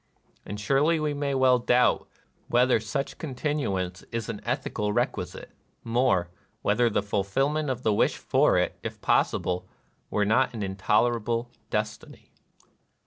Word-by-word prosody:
And 105 Hz, +1 st, -5 dB
surely 140 Hz, +9 st, +2 dB
we 150 Hz, -1 st, 0 dB
may 140 Hz, -1 st, -1 dB
well 130 Hz, -1 st, +4 dB
doubt 125 Hz, +1 st, +2 dB, 0.4 s
whether 125 Hz, 0 st, +3 dB
such 135 Hz, +6 st, -4 dB
con 140 Hz, -5 st, -5 dB
tinuance 100 Hz, -, -2 dB
is 115 Hz, -2 st, -3 dB
an 110 Hz, -3 st, -5 dB
ethical 105 Hz, 0 st, -2 dB
requisite: -, -, -2 dB, 0.3 s
more, 115 Hz, -7 st, +1 dB, 0.3 s
whether 115 Hz, +3 st, +3 dB
the 105 Hz, -, 0 dB
fulfillment 135 Hz, +10 st, 0 dB
of 130 Hz, -1 st, -3 dB
the 110 Hz, -, +3 dB
wish -, -, +2 dB
for -, -, +3 dB
it, -, -, 0 dB
if -, -, -6 dB
possible, 90 Hz, 0 st, +1 dB, 0.4 s
were 105 Hz, -1 st, +1 dB
not 115 Hz, +4 st, +2 dB
an 105 Hz, -, -3 dB
intolerable 115 Hz, +4 st, 0 dB, 0.2 s
destiny." 105 Hz, 0 st, -4 dB
115 Hz, 140 wpm, -27 LUFS, 105-130 Hz, 0.4 s, well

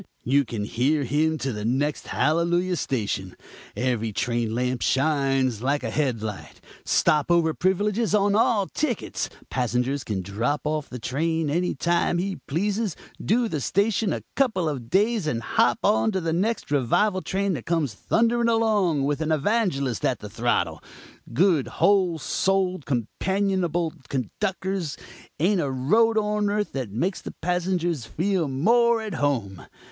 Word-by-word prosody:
you 140 Hz, +3 st, +3 dB
can 115 Hz, -4 st, -4 dB
hear 135 Hz, +8 st, +1 dB
him 155 Hz, +5 st, +1 dB
to 135 Hz, -3 st, -3 dB
the 105 Hz, 0 st, -5 dB
next 135 Hz, +6 st, -1 dB
hallelujah 175 Hz, +3 st, +1 dB
station. 105 Hz, -, -2 dB, 0.4 s
Every 120 Hz, -3 st, -1 dB
train 115 Hz, +1 st, -1 dB
lamp 125 Hz, 0 st, -1 dB
shines 135 Hz, -4 st, +1 dB
like 140 Hz, +3 st, 0 dB
a -, -, -3 dB
head 130 Hz, -7 st, -1 dB
light. 105 Hz, -2 st, -6 dB, 0.2 s
Stop 150 Hz, 0 st, +2 dB
over 170 Hz, -2 st, +3 dB
privileges 205 Hz, +5 st, +1 dB
on 200 Hz, 0 st, +3 dB
all 210 Hz, -1 st, +3 dB
tickets; 250 Hz, +1 st, -2 dB, 0.2 s
passenger 125 Hz, +1 st, 0 dB
can 95 Hz, -4 st, -3 dB
drop 115 Hz, +10 st, -1 dB
off 150 Hz, -1 st, -2 dB
the 125 Hz, -, -6 dB
train 155 Hz, +5 st, -1 dB
any 175 Hz, +3 st, 0 dB
time 170 Hz, +3 st, +1 dB
he 190 Hz, +1 st, -2 dB
pleases, 200 Hz, +6 st, -1 dB, 0.3 s
do 235 Hz, +3 st, +2 dB
the 155 Hz, -9 st, -3 dB
station 205 Hz, -, +1 dB
a -, -, -3 dB
couple 220 Hz, -11 st, +1 dB
of 130 Hz, -6 st, -4 dB
days 210 Hz, -1 st, +2 dB
and 115 Hz, -6 st, -1 dB
hop 120 Hz, +2 st, +2 dB
on 110 Hz, -, +3 dB
to 190 Hz, -, 0 dB
the 165 Hz, -2 st, -1 dB
next 200 Hz, -1 st, -1 dB
revival 185 Hz, -, +2 dB
train 195 Hz, +1 st, -1 dB
that 130 Hz, -8 st, -6 dB
comes 160 Hz, -8 st, 0 dB
thundering 235 Hz, -, +1 dB
along 210 Hz, -10 st, +2 dB
with 145 Hz, +2 st, -1 dB
an 160 Hz, 0 st, -1 dB
evangelist 155 Hz, -, 0 dB
at -, -, +1 dB
the -, -, -9 dB
throttle. -, -, 0 dB, 0.5 s
Good, 160 Hz, +1 st, +3 dB
whole 190 Hz, -4 st, +2 dB
souled, 185 Hz, +1 st, 0 dB
companionable 175 Hz, -, -1 dB, 0.2 s
conductors; 185 Hz, -, -2 dB, 0.4 s
ain't 185 Hz, +3 st, +2 dB
a 140 Hz, -, -1 dB
road 220 Hz, -, +2 dB
on 210 Hz, -1 st, +1 dB
earth 210 Hz, 0 st, -1 dB
that 130 Hz, -5 st, -4 dB
makes 170 Hz, -, -2 dB
the -, -, -8 dB
passengers 175 Hz, -6 st, -1 dB
feel 180 Hz, -1 st, 0 dB
more 230 Hz, -, +3 dB
at 215 Hz, -3 st, -5 dB
home. 120 Hz, -, -1 dB
160 Hz, 150 wpm, -25 LUFS, 130-195 Hz, 0.5 s, you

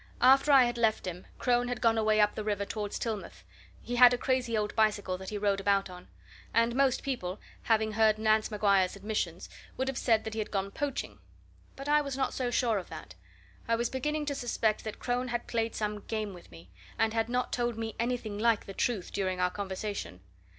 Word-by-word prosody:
After 270 Hz, +4 st, +6 dB
I 270 Hz, -2 st, +8 dB
had 240 Hz, 0 st, -1 dB
left 220 Hz, -2 st, +2 dB
him, 180 Hz, 0 st, -6 dB
Crone 245 Hz, -1 st, +1 dB
had 245 Hz, 0 st, -3 dB
gone 230 Hz, -1 st, +3 dB
away 215 Hz, -1 st, +2 dB
up 210 Hz, 0 st, +4 dB
the 215 Hz, -, -4 dB
river 205 Hz, -1 st, -1 dB
towards 210 Hz, -1 st, -4 dB
Tillmouth 220 Hz, -4 st, -5 dB, 0.4 s
he 245 Hz, 0 st, -3 dB
had 245 Hz, 0 st, +8 dB
a -, -, -5 dB
crazy 250 Hz, -3 st, 0 dB
old 210 Hz, -1 st, -2 dB
bicycle 210 Hz, -4 st, +1 dB
that 190 Hz, -, -7 dB
he 210 Hz, -, -4 dB
rode 200 Hz, -1 st, +1 dB
about 195 Hz, -1 st, +1 dB
on. 180 Hz, 0 st, -11 dB, 0.5 s
And 230 Hz, +1 st, +3 dB
most 270 Hz, -2 st, +2 dB
people, 215 Hz, -8 st, -3 dB, 0.2 s
having 220 Hz, -1 st, +2 dB
heard 215 Hz, 0 st, +3 dB
Nance 215 Hz, 0 st, +2 dB
Maguire's 200 Hz, -3 st, +2 dB
admissions, 200 Hz, -4 st, -3 dB, 0.3 s
would 260 Hz, -, -1 dB
have 270 Hz, -2 st, -2 dB
said 225 Hz, -3 st, +2 dB
that 220 Hz, -, -5 dB
he 220 Hz, -, -3 dB
had 215 Hz, -, -3 dB
gone 195 Hz, -1 st, -2 dB
poaching. 290 Hz, +1 st, -4 dB, 0.6 s
But 275 Hz, +1 st, -8 dB
I 300 Hz, 0 st, +4 dB
was 275 Hz, -2 st, -4 dB
not 265 Hz, -1 st, 0 dB
so 255 Hz, -2 st, -1 dB
sure 230 Hz, -3 st, +1 dB
of 180 Hz, -, -10 dB
that. -, -, -9 dB, 0.5 s
I 230 Hz, -, +3 dB
was 235 Hz, +1 st, -1 dB
beginning 300 Hz, +3 st, -2 dB
to 290 Hz, -, -1 dB
suspect 230 Hz, -5 st, 0 dB
that 215 Hz, -, -5 dB
Crone 245 Hz, +1 st, -1 dB
had 240 Hz, -1 st, -3 dB
played 230 Hz, -1 st, -1 dB
some 210 Hz, -1 st, -2 dB
game 215 Hz, -1 st, -4 dB
with 175 Hz, -, -13 dB
me, 85 Hz, +1 st, -15 dB, 0.3 s
and 225 Hz, 0 st, +1 dB
had 225 Hz, 0 st, 0 dB
not 250 Hz, +1 st, -1 dB
told 240 Hz, -2 st, -1 dB
me 225 Hz, -1 st, -4 dB
anything 235 Hz, -3 st, -2 dB
like 230 Hz, -1 st, +2 dB
the 195 Hz, -, -8 dB
truth 210 Hz, -3 st, -1 dB
during 185 Hz, -2 st, -1 dB
our 180 Hz, 0 st, +2 dB
conversation. 195 Hz, -, -5 dB
220 Hz, 215 wpm, -30 LUFS, 205-245 Hz, 0.6 s, I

